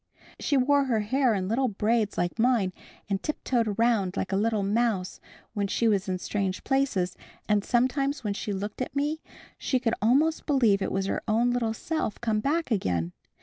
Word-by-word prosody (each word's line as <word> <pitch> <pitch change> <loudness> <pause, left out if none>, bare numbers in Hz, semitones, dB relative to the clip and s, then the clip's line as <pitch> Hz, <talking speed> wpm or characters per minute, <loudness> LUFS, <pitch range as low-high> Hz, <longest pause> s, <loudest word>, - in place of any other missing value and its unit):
She 285 - +1
wore 280 +2 +3
her 230 -5 +1
hair 250 +2 +2
in 185 -1 -2
little 250 +6 +1
braids 215 0 0
like 175 +5 -1
mine 225 -6 +2 0.3
and 195 -1 -1
tiptoed 250 -6 -1
around 210 -3 +1
like 190 - -2
a - - +1
little 215 0 +1
mouse 205 -2 0 0.3
when 205 -2 -1
she 230 +4 +1
was 200 -3 +1
in 185 - 0
strange 190 0 -2
places, 255 -10 0 0.3
and 210 -1 +2
sometimes 260 +4 +1
when 205 -2 -1
she 205 - -4
looked 205 +4 -4
at 255 - -4
me 295 +3 -1 0.4
she 260 - 0
could 235 -2 0
almost 285 +9 +2
believe 235 -9 +3
it - - -1
was 195 0 -1
her - - -2
own 230 +3 +2
little 230 -2 0
self 315 -6 -3
come 220 -2 0
back 300 +5 -1
again. 90 - 0
225 Hz, 190 wpm, -27 LUFS, 200-255 Hz, 0.4 s, wore